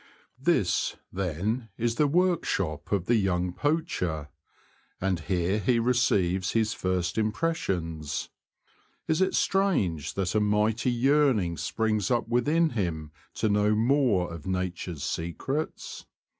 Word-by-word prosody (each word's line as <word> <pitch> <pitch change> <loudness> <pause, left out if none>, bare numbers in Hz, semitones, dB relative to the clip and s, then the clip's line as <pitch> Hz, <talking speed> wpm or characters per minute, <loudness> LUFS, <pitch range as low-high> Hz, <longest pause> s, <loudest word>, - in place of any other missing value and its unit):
This, 130 - +1 0.2
then, 100 +6 -2
is 120 0 -1
the 150 -1 +4
workshop 150 - 0
of 100 -4 +1
the 120 +2 +3
young 90 -3 0
poacher, 90 - -1 0.7
and 95 -2 0
here 90 +4 0
he 115 +4 +2
receives 105 -7 +1
his 110 -1 +1
first 95 +1 -1
im 110 0 +1
pressions. 80 - -2 0.8
Is 160 +3 +1
it 190 - +2
strange 140 - +1
that 95 -2 -1
a 110 - +3
mighty 105 +3 +1
yearning 125 - +2
springs 110 +4 -1
up 120 -2 +1
within 150 +7 +2
him 85 -9 -3 0.2
to 110 - 0
know 105 +1 +3
more 115 -7 +2
of 85 +1 -9
nature's 90 -4 -3
secrets 135 - -4
105 Hz, 125 wpm, -27 LUFS, 90-125 Hz, 0.8 s, the